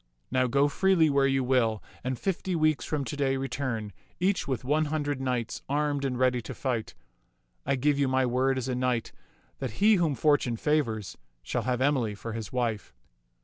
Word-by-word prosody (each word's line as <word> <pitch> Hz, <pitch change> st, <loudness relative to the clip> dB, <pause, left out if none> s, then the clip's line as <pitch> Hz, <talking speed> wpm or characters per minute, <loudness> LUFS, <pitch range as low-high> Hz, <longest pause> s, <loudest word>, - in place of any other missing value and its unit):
Now 130 Hz, 0 st, +2 dB
go 140 Hz, +3 st, +3 dB
freely 165 Hz, 0 st, +3 dB
where 140 Hz, -1 st, +3 dB
you 135 Hz, -1 st, +1 dB
will, 120 Hz, -4 st, +1 dB, 0.2 s
and 130 Hz, 0 st, -2 dB
fifty 190 Hz, +3 st, -2 dB
weeks 155 Hz, -2 st, +2 dB
from 145 Hz, -3 st, -2 dB
to 120 Hz, -, -4 dB
day 135 Hz, -2 st, +1 dB
return, 125 Hz, -6 st, -3 dB, 0.3 s
each 185 Hz, +1 st, +1 dB
with 130 Hz, -4 st, -2 dB
one 150 Hz, +4 st, +2 dB
hundred 145 Hz, -2 st, -2 dB
knights, 125 Hz, -3 st, -2 dB
armed 145 Hz, -1 st, 0 dB
and 130 Hz, -2 st, -1 dB
ready 125 Hz, -1 st, +2 dB
to 110 Hz, -, -8 dB
fight. 120 Hz, -5 st, -3 dB, 0.7 s
I 140 Hz, -, +2 dB
give 140 Hz, +2 st, +1 dB
you 140 Hz, -, +3 dB
my 130 Hz, 0 st, +2 dB
word 130 Hz, +2 st, +1 dB
as 130 Hz, -, -2 dB
a 130 Hz, -, -1 dB
knight 125 Hz, -2 st, -1 dB, 0.5 s
that 130 Hz, -5 st, -4 dB
he 210 Hz, -, +4 dB
whom 165 Hz, -5 st, +1 dB
fortune 135 Hz, -3 st, +2 dB
favors 115 Hz, -9 st, -1 dB, 0.2 s
shall 120 Hz, -, -2 dB
have 125 Hz, 0 st, 0 dB
Emily 130 Hz, -7 st, +1 dB
for 115 Hz, +3 st, -6 dB
his 110 Hz, -3 st, -5 dB
wife." 115 Hz, -, -2 dB
130 Hz, 190 wpm, -28 LUFS, 120-145 Hz, 0.7 s, he